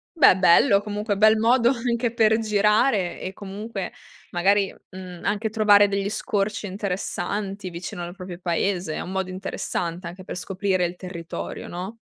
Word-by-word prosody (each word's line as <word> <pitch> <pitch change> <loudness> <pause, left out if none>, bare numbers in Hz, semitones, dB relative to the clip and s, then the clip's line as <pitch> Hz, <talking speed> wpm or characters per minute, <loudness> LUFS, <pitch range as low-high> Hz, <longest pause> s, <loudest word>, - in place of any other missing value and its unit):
Beh 310 - +7
bello. 195 +4 +5
Comunque 210 0 -2
bel 215 +1 +6
modo 235 +2 +4
anche 235 -2 -1
per 220 -1 +4
girare 210 -2 +2
e 185 - -4
comunque 200 0 -6 0.4
magari, 195 +3 +2 0.2
mhmm, 185 -2 -9
anche 210 +2 0
trovare 205 -2 +5
degli 200 0 -1
scorci 210 -2 -2
interessanti 195 0 -3
vicino 175 0 -6
al 175 +1 -7
proprio 185 -2 -8
paese. 175 -1 -1
È - - -3
un 185 - -6
modo 190 -1 -2
interessante 180 -2 -4
anche 180 +2 -9
per - - -6
scoprire 185 0 -1
il 175 - -4
territorio, 175 -2 -7
no? 190 +6 -6
200 Hz, 155 wpm, -24 LUFS, 180-215 Hz, 0.4 s, Beh